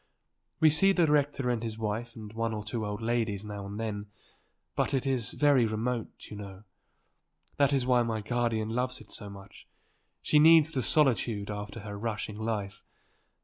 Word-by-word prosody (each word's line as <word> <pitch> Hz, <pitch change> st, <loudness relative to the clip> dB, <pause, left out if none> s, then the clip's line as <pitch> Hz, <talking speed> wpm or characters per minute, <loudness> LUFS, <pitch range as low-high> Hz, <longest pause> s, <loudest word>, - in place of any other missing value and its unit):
"We 155 Hz, -1 st, +6 dB
see 195 Hz, +6 st, +4 dB
the 175 Hz, -3 st, +3 dB
rector 145 Hz, -4 st, +1 dB
and 120 Hz, -2 st, -1 dB
his 110 Hz, -2 st, -4 dB
wife 115 Hz, +2 st, -3 dB
and 110 Hz, -2 st, -9 dB
one 115 Hz, 0 st, -2 dB
or 105 Hz, -, -5 dB
two 110 Hz, 0 st, -3 dB
old 105 Hz, +2 st, -5 dB
ladies 110 Hz, -3 st, -1 dB
now 100 Hz, -1 st, -6 dB
and 100 Hz, +2 st, -6 dB
then. 105 Hz, -2 st, -4 dB, 0.7 s
But 140 Hz, -, 0 dB
it 135 Hz, -, -1 dB
is 130 Hz, -5 st, -1 dB
very 140 Hz, -5 st, +4 dB
remote, 115 Hz, +2 st, -3 dB
you -, -, -6 dB
know. 100 Hz, -1 st, -9 dB, 0.9 s
That 140 Hz, -1 st, +4 dB
is 135 Hz, -3 st, +1 dB
why 125 Hz, -1 st, +4 dB
my 115 Hz, -2 st, -1 dB
guardian 115 Hz, -1 st, -1 dB
loves 125 Hz, +2 st, -2 dB
it -, -, -13 dB
so 105 Hz, -, -5 dB
much. 100 Hz, 0 st, -13 dB, 0.6 s
She 150 Hz, -, +4 dB
needs 160 Hz, 0 st, +7 dB
the 135 Hz, -, -1 dB
solitude 115 Hz, -6 st, +2 dB
after 105 Hz, +2 st, -6 dB
her 105 Hz, -1 st, -7 dB
rushing 105 Hz, -1 st, -4 dB
life. 105 Hz, -3 st, -3 dB
115 Hz, 180 wpm, -29 LUFS, 105-130 Hz, 0.9 s, needs